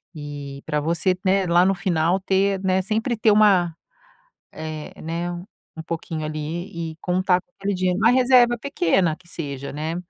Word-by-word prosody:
e 145 -2 -7
pra 150 -1 -1
você, 170 +5 +1
né, 190 0 +3
lá 175 +1 +4
no 195 - +2
final, 175 0 +1
ter, 195 +1 +1
né, 190 0 +2
sempre 225 +4 -1
ter 220 0 +4
uma, 195 -6 +4 0.8
eh, 155 -1 -6
né, 170 +2 -3 0.5
um 160 - -6
pouquinho 160 -1 -4
ali, 160 +2 -5
e - - -16
contar 180 0 +2
com - - -46
aquele 200 0 -1
dinheiro. 185 0 0
Uma 220 - +5
reserva 245 -1 +5
pequena, 180 - +1
que 170 +1 -21
seja, 140 -5 -6
né. 155 +3 -4
175 Hz, 165 wpm, -23 LUFS, 160-195 Hz, 0.8 s, Uma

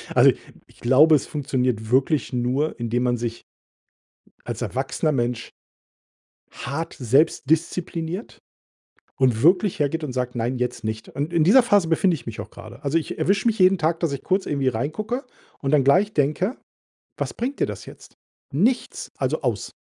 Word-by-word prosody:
Also, - - +7 0.4
ich - - -23
glaube, 135 +6 +5
es 145 - -1
funktioniert 125 -6 -2
wirklich 135 +2 +2
nur, 125 +5 0
indem 120 +1 -1
man 120 -1 +1
sich 115 0 -4 1.0
als - - -4
erwachsener 135 +4 -1
Mensch 120 -2 -2 1.0
hart 150 +6 -5
selbst 135 +3 +2
diszipliniert 165 +3 -2 0.8
und 125 -4 +2
wirklich 180 +2 +3
hergeht 150 +2 0
und 130 - -4
sagt: 125 -1 -3
„Nein, 120 +3 -1
jetzt 125 -2 -3
nicht.“ 110 0 -4
Und 145 +5 -4
in 165 -2 +3
dieser 235 +8 +6
Phase 205 -7 +3
befinde 170 +2 +2
ich 130 -7 -8
mich 115 - -6
auch - - -8
gerade. - - -12
Also, 140 +4 0
ich 165 - -2
erwische 200 +4 +1
mich 225 - 0
jeden 185 +1 +5
Tag, 165 0 0
dass 165 -5 0
ich 140 - -5
kurz 190 +1 0
irgendwie 140 -3 0
reingucke 210 - -3 0.3
und 135 +1 -2
dann 140 -3 +4
gleich 190 +9 +3
denke: 155 - 0 0.6
„Was - - -3
bringt 260 +4 -3
dir - - +2
das - - -7
jetzt? - - -14 0.4
Nichts. 220 - 0
Also - - -1
aus.” - - -2
145 Hz, 170 wpm, -23 LUFS, 125-175 Hz, 1.0 s, Also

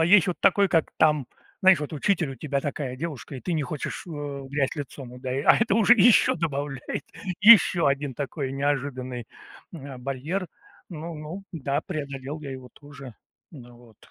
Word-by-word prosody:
а 160 - +4
есть 190 +1 +6
вот 180 - -3
такой, 200 0 +4
как 165 -3 +1
там, 150 -4 +3 0.3
знаешь, 190 -4 +6
вот 150 - -5
учитель 160 0 0
у - - -6
тебя 140 -1 -2
такая 140 -3 -4
девушка, 145 -2 -6
и 130 - -7
ты 180 - -3
не 155 -2 0
хочешь, 145 +4 -5
э, - - -9
в 145 -3 -6
грязь 140 -1 -1
лицом, 135 -3 -7
удаи 130 +2 -4
А - - +6
это 225 -3 +2
уже 225 +1 +5
ещё 230 +1 +5
добавляет 145 -4 -4 0.4
ещё 210 -5 +7
один 140 -1 0
такой 140 0 -4
неожиданный, 130 -3 -2 0.5
м, 160 -6 -9
а, 130 - -9
барьер. 140 +9 -3 0.4
Ну, 165 -1 -7
ну 155 +6 -8
да, 140 -3 -2
преодолел 140 -3 -6
я 145 -2 -7
его 130 -2 -10
тоже. 140 -4 -12 0.4
Ну 120 -6 -13
вот. 120 -3 -19
145 Hz, 185 wpm, -25 LUFS, 135-165 Hz, 0.5 s, ещё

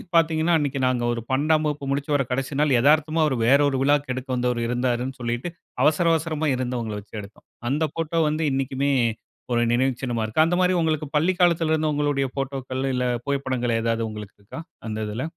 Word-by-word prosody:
பார்த்தீங்கனா, 165 0 +3
அன்னைக்கு 145 -2 -1
நாங்க 125 -2 0
ஒரு 115 - -4
12ஆம் 155 +4 +2
வகுப்பு 145 -1 -3
முடிச்சு 140 +2 -2
வற 140 - +2
கடைசி 135 +2 -2
நாள் 145 -5 +3
எதார்த்தமா 155 +3 +3 0.2
வேற 140 +3 +6
ஒரு 135 - -1
விழாக்கு 145 -1 +2
எடுக்க 130 +1 -6
வந்தவரு 125 -1 0
இருந்தாருன்னு 125 +2 -1
சொல்லிட்டு 120 +7 -2 0.3
அவசர 155 +4 +3
அவசரமா 160 -1 -1
இருந்தவங்கள 120 -4 -3
வச்சு 105 - -13
எடுத்தோம். 100 +2 -15 0.2
அந்த 145 +4 0
போட்டோ 165 0 -1
வந்து 155 +2 -1
இன்னைக்குமே 135 +1 0 0.6
ஒரு 120 - +2
நினைவு 130 +2 +2
சின்னமா 120 -3 -2
இருக்கு. 135 +9 +3
அந்த 175 +2 +1
மாரி 185 0 +3
உங்களுக்கு 155 -1 0
பள்ளி 165 +5 +3
காலத்தில 170 -3 +3
இருந்து 155 -1 +1
உங்களுடைய 145 -2 0
போட்டோக்கள் 130 -1 -3
இல்ல 125 0 0 0.2
புகைப்படங்கள் 130 -4 -1
எதாவது 115 0 0
உங்களுக்கு 105 -2 -9
இருக்கா? 100 +10 -9 0.3
அந்த 110 -1 -4
இதில. 110 +5 -4
135 Hz, 180 wpm, -24 LUFS, 125-155 Hz, 0.6 s, வேற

